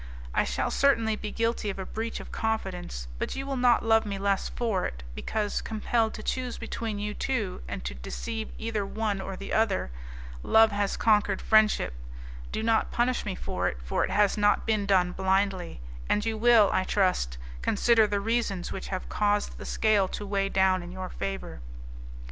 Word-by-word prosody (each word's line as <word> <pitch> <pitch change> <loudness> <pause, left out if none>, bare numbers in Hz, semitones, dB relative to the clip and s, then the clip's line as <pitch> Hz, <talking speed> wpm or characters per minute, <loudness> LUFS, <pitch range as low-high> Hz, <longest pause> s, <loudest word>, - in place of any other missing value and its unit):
I - - +2
shall - - -1
certainly 230 -6 +3
be 210 0 -5
guilty 230 -2 -1
of 195 - -4
a 190 - -4
breach 225 +3 -4
of - - -10
confidence, 185 - -3
but - - -2
you 270 0 -4
will 275 0 -2
not 245 -3 +3
love 225 0 +5
me 200 -2 -4
less 195 0 0
for 225 -6 -1
it, 60 -1 -9
because, 210 - -2
compelled 220 +1 0
to 215 - -8
choose 255 -2 -2
between 225 -2 -4
you 210 +1 -3
two, 220 - -2
and 65 -1 -5
to 65 - -3
deceive 220 - -5
either 220 -2 -2
one 205 0 -2
or 190 0 -5
the 195 - -6
other, 210 - +1 0.5
love 220 - +5
has 205 -1 -1
conquered 210 -3 +3
friendship; 215 - +3 0.6
do 220 - -2
not 225 -1 +2
punish 245 +1 +1
me 190 - -2
for - - -2
it, - - -2
for - - 0
it - - -1
has 210 0 +2
not 205 0 +3
been 215 -3 +1
done 185 -3 +3
blindly, 190 - 0 0.3
and 210 +1 +2
you 225 -1 0
will, 225 -2 +5
I 185 - +2
trust, 185 - +1 0.2
consider 225 +1 +4
the 205 -1 0
reasons 215 -4 -1
which 190 - -5
have 185 -1 -4
caused 205 0 0
the - - -7
scale 210 -3 +2
to 205 - -5
weigh 195 -1 0
down 190 -1 +3
in 175 0 -8
your 185 0 -6
favour. 195 - -5
210 Hz, 190 wpm, -28 LUFS, 190-225 Hz, 0.6 s, love